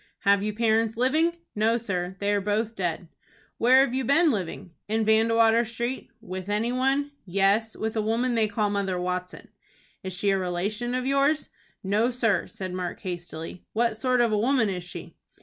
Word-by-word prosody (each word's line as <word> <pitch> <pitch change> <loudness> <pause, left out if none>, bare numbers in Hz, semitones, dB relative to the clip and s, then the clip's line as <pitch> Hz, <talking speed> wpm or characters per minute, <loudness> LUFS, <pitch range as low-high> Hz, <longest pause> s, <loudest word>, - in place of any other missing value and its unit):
"Have 200 0 +4
you 210 +1 -1
parents 225 0 +1
living?" 315 +7 +2 0.2
"No, 220 +2 +2
sir; 185 -5 -3
they 205 0 +1
are 205 - +1
both 210 +3 -1
dead." 175 -2 -3 0.5
"Where 255 +3 +6
have 245 - -6
you 265 0 0
been 305 +6 +4
living?" 190 -3 -4 0.2
"In 220 +1 0
Vandewater 225 +1 +4
Street." 240 +3 -4
"With 185 -3 -7
any 215 +3 0
one?" 270 +3 +1
"Yes, 200 +4 +1
with 220 +1 -3
a 220 - +1
woman 230 +4 0
they 225 -2 +2
call 210 0 0
Mother 195 -3 -1
Watson." 180 0 -4 0.5
"Is 190 -1 -5
she 200 +2 +1
a 195 - +1
relation 205 +7 -2
of 255 0 -2
yours?" 275 +3 +1 0.3
"No, 210 +5 +2
sir," 225 -7 +1
said 185 -1 -6
Mark, 180 -1 -4
hastily. 175 -2 -6
"What 230 0 +1
sort 250 +2 +1
of 235 -2 +2
a 210 - +2
woman 245 -1 +2
is 180 -2 -3
she?" 175 -1 -8
220 Hz, 185 wpm, -26 LUFS, 190-240 Hz, 0.5 s, Where